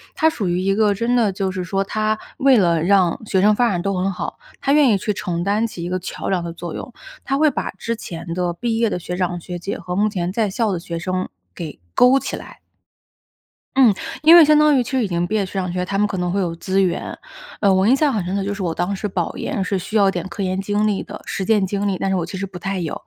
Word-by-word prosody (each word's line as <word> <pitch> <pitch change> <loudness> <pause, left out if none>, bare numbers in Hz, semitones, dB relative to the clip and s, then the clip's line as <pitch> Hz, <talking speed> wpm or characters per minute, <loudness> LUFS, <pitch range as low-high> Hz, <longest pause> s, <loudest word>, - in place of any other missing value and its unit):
她 320 - +4
属 215 - -3
于 175 +1 0
一 195 +1 +1
个 210 -1 +3
真 230 +5 0
的 220 -5 +3
就 190 0 -2
是 185 -1 -4
说， 195 +2 -1
她 215 +2 -1 0.2
为 265 -2 +5
了 170 -4 +3
让 185 -2 +3
学 190 -3 +1
生 210 +2 +5
发 240 0 +3
展 175 -4 -1
都 195 +2 -1
很 190 +2 0
好， 180 - -5 0.2
她 275 - +1
愿 295 -4 +5
意 205 - +4
去 210 +2 -2
承 175 -2 -3
担 210 +4 +1
起 170 -5 -8
一 175 - -3
个 185 0 -1
桥 180 - -5
梁 180 -3 0
的 170 -1 -5
作 170 -1 -7
用。 245 - -7 0.3
她 275 0 0
会 305 -1 +4
把 - - -3
之 230 +4 -4
前 170 -4 -6
的 175 -1 -1
毕 225 +4 -2
业 230 -1 +2
的 - - -2
学 180 0 -5
长 175 -1 -1
学 175 0 -6
姐 195 - -4
和 180 0 -5
目 210 +2 +3
前 180 -3 -2
在 215 -1 0
校 215 +1 0
的 175 - -2
学 170 -1 -5
生 185 +2 -2 0.3
给 155 -4 -7
勾 255 +2 +5
起 - - -4
来。 - - -12 1.2
嗯， 255 -6 +6 0.3
因 325 +3 +8
为 335 -3 +9
相 305 0 +5
当 300 -2 +5
于 250 - +2
其 - - -8
实 260 -2 +1
已 210 - 0
经 175 -1 -1
毕 205 - -5
业 215 - +2
的 195 - -1
学 - - -12
长 185 -2 -2
学 180 - -2
姐， 180 - -1
他 195 - -2
们 210 - +3
可 195 - -4
能 180 0 -1
会 200 - 0
有 170 -3 -1
资 190 +3 -1
源。 180 -2 -1 0.4
呃， 200 -2 +4
我 190 +2 +3
印 260 - +6
象 290 -1 +2
很 205 -5 -1
深 185 +3 -3
的 200 - -1
就 205 - -2
是 200 - -6
我 170 -3 -1
当 180 +4 -1
时 210 - -3
保 180 -3 -3
研 195 - -2
是 190 +1 -1
需 205 +4 -2
要 195 -2 +4
点 180 0 -4
科 195 +3 -4
研 185 +1 -1
经 205 +2 0
历 205 -2 0
的 - - -8
实 190 - -3
践 210 -2 +2
经 200 +1 -2
历， 190 - 0
但 195 - -2
是 190 - +1
我 175 - 0
其 185 +3 -6
实 195 - -3
不 185 -2 -9
太 195 0 -3
有， 165 -3 -3
195 Hz, 310 characters per minute, -20 LUFS, 180-215 Hz, 1.2 s, 为